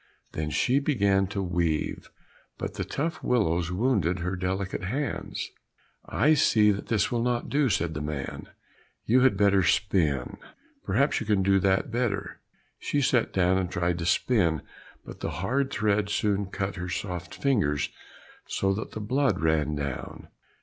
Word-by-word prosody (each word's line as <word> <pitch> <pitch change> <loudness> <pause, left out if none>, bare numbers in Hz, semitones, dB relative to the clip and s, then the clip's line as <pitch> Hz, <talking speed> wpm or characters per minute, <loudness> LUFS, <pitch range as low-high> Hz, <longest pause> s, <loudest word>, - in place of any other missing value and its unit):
Then 75 -1 -3
she 125 - +2
began 100 -9 +2
to 100 0 -3
weave, 85 -3 -1 0.5
but - - -4
the - - -3
tough 160 +4 -3
willows 90 -8 +1
wounded 95 - +1
her 90 +2 -2
delicate 95 +1 -3
hands. 135 +9 -3 0.6
"I 150 +5 +3
see 110 -7 +4
that 100 - -4
this 105 -3 +1
will 120 -1 0
not 120 0 -1
do," 145 -2 +2
said 85 -4 0
the 75 - -4
man; 75 -2 -5 0.6
"you 125 +3 +4
had 130 -6 +4
better 100 -1 +4
spin, 85 -6 +1 0.5
perhaps 135 +9 +1
you 115 - -6
can 100 -3 +2
do 95 0 +4
that 95 +7 +1
better." 105 -5 -2 0.4
She 145 - -1
sat 125 -3 +2
down 95 0 +2
and 90 -2 -2
tried 85 0 -1
to 85 - -2
spin, 85 - +2 0.4
but - - -10
the - - -3
hard 135 +9 -1
thread 105 -4 +1
soon 100 -1 0
cut 95 -1 -4
her 90 0 -4
soft 90 +1 -4
fingers 100 - +1 0.6
so 95 0 0
that 110 +3 -5
the 110 - -5
blood 130 +6 +1
ran 75 -2 +1
down. 70 -3 -5
95 Hz, 160 wpm, -27 LUFS, 85-120 Hz, 0.6 s, see